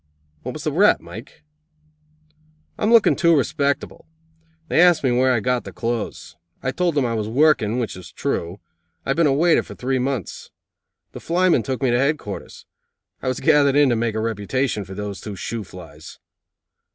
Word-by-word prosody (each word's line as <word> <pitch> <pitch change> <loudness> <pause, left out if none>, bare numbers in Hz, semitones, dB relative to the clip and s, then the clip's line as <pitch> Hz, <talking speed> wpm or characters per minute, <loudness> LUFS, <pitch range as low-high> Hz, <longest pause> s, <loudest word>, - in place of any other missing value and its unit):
"What - - -6
was - - -8
the - - -1
rap, - - +4
Mike?" - - -12 1.3
"I'm 215 +1 0
looking 230 -2 +5
too 170 -3 +3
respectable. 140 +2 -2 0.6
They 165 - +3
asked 175 -4 +5
me 130 - +2
where 130 +2 +3
I 120 -3 +1
got 125 +1 0
the - - -9
clothes. 115 -7 -4 0.3
I 130 - 0
told 175 +3 -1
them 140 -3 +2
I 115 - -1
was 110 -2 -2
working, 125 -3 +2
which 120 -3 -3
was 90 -1 -11
true. 85 +4 -3 0.5
I - - -6
have 135 - -1
been 165 -2 +4
a - - +3
waiter 165 +5 +3
for - - -11
three 130 +1 -1
months. 130 - -4 0.6
The - - -9
flymen 175 -5 +2
took 130 +5 -4
me 130 - +2
to 120 - +2
headquarters. 140 -7 -3 0.6
I - - -5
was 130 0 -2
gathered 145 -3 +4
in 145 -2 +5
to 120 - +2
make 115 -1 -1
a - - -1
reputation 110 +1 -2
for 95 - -9
those 100 -2 -6
two 105 -2 -7
shoo 115 +4 -5
flies. 80 -5 -12
125 Hz, 190 wpm, -21 LUFS, 110-145 Hz, 1.3 s, looking